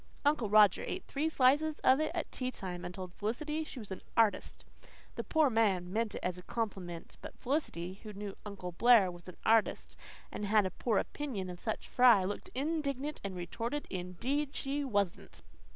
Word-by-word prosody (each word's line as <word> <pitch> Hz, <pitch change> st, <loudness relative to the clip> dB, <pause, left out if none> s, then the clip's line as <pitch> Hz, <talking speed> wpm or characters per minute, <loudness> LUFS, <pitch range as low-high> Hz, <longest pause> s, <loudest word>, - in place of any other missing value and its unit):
Uncle 285 Hz, -7 st, +2 dB
Roger 210 Hz, -2 st, +6 dB
ate 380 Hz, -, -4 dB
three 300 Hz, +3 st, -1 dB
slices 295 Hz, +2 st, +3 dB
of 260 Hz, +2 st, +5 dB
it 310 Hz, -, +1 dB
at 335 Hz, -, -3 dB
tea 255 Hz, -1 st, -2 dB
time 180 Hz, -7 st, -6 dB
and 180 Hz, -, -6 dB
told 185 Hz, -2 st, -7 dB
Felicity 300 Hz, +11 st, -2 dB
she 305 Hz, -, -10 dB
was 215 Hz, -5 st, -8 dB
an 190 Hz, -, -5 dB, 0.2 s
artist. 225 Hz, -3 st, +2 dB, 0.5 s
The -, -, -4 dB
poor 310 Hz, -4 st, +3 dB
man 190 Hz, -5 st, +2 dB
meant 225 Hz, 0 st, 0 dB
it -, -, -6 dB
as 180 Hz, 0 st, -2 dB
a -, -, -9 dB
compliment; 185 Hz, -5 st, -5 dB
but -, -, -9 dB
Felicity, 195 Hz, -, -2 dB
who 215 Hz, -, -8 dB
knew 205 Hz, -1 st, -6 dB
Uncle 200 Hz, -4 st, -6 dB
Blair 210 Hz, 0 st, +5 dB
was 175 Hz, 0 st, -12 dB
an 180 Hz, -, -10 dB
artist 225 Hz, -1 st, +2 dB, 0.4 s
and -, -, -5 dB
had 210 Hz, -1 st, +4 dB
a 185 Hz, -, -2 dB
poor 225 Hz, -5 st, 0 dB
opinion 215 Hz, -11 st, -3 dB
of 175 Hz, -, -9 dB
such 220 Hz, +1 st, -3 dB
fry, 240 Hz, -6 st, +6 dB
looked 200 Hz, +2 st, -4 dB
indignant 290 Hz, 0 st, -2 dB
and 195 Hz, -2 st, -4 dB
retorted, 230 Hz, +11 st, -3 dB
indeed 245 Hz, +11 st, -2 dB
she 285 Hz, +1 st, -2 dB
wasn't! 200 Hz, -, -2 dB
220 Hz, 185 wpm, -33 LUFS, 185-275 Hz, 0.5 s, Roger